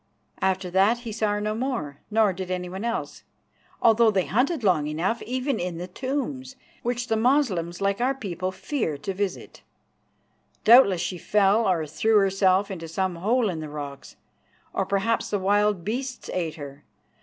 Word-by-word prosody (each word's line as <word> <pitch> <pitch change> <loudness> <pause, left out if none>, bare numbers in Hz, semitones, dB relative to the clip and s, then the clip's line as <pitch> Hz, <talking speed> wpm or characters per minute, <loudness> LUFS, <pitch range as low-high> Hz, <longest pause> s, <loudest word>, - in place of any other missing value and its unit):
After 190 -1 0
that 200 +6 +3
he 235 -2 -6
saw 215 -1 0
her 205 - -1
no 215 0 -1
more, 225 - -3
nor 215 -2 +3
did 185 0 -6
anyone 185 +2 -4
else, 235 0 -3 0.6
although 230 0 +6
they 195 -4 +1
hunted 255 - 0
long 165 -7 +2
enough, 175 +10 -1
even 260 +3 -2
in 175 -1 -3
the 175 - -4
tombs, 260 +4 -4 0.3
which 245 0 -2
the 225 - 0
Moslems, 220 - +1
like 200 +3 0
our 265 +2 +2
people, 185 -7 -4
fear 190 - -3
to 195 +7 -4
visit. 195 0 -4 1.0
Doubtless 215 -6 +7
she 180 0 -3
fell 205 +2 +3
or 165 -4 +1
threw 185 +9 +2
herself 195 0 +3
into 165 -3 -6
some 185 +2 -2
hole 225 +6 +1
in 175 -5 -3
the 155 -1 -6
rocks; 145 -2 -8 0.6
or - - -1
perhaps 200 +4 0
the 205 - 0
wild 205 -1 +1
beasts 255 +4 -4
ate 170 -4 -2
her. 140 -2 -9
200 Hz, 165 wpm, -25 LUFS, 180-235 Hz, 1.0 s, Doubtless